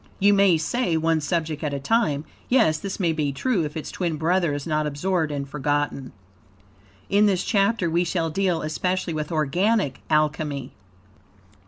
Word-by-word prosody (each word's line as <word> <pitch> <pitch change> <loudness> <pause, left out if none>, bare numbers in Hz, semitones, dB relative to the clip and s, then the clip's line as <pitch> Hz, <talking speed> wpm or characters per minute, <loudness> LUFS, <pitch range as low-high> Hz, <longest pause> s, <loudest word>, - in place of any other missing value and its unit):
You 205 +1 +4
may 195 -4 +5
say, 170 +2 0
one 160 0 +1
subject 160 -1 -2
at 145 -2 -1
a - - -3
time. 155 - +1 0.2
Yes, 220 -12 +3
this 195 0 -5
may 170 -4 +1
be 150 -2 -1
true, 195 - 0
if 150 +1 -6
its 155 - -5
twin 170 -4 -2
brother 170 +1 +1
is 145 -1 -4
not 155 -2 0
absorbed 160 +2 -1
and 140 -1 -3
forgotten. 145 -1 -2 1.0
In 205 +2 +4
this 190 -2 +1
chapter, 200 -2 +1
we 170 +2 +1
shall 170 -2 -1
deal 180 -2 0
especially 180 +3 -1
with 155 +1 -4
organic 165 - +1
Alchemy. 150 -3 0
160 Hz, 165 wpm, -24 LUFS, 150-190 Hz, 1.0 s, may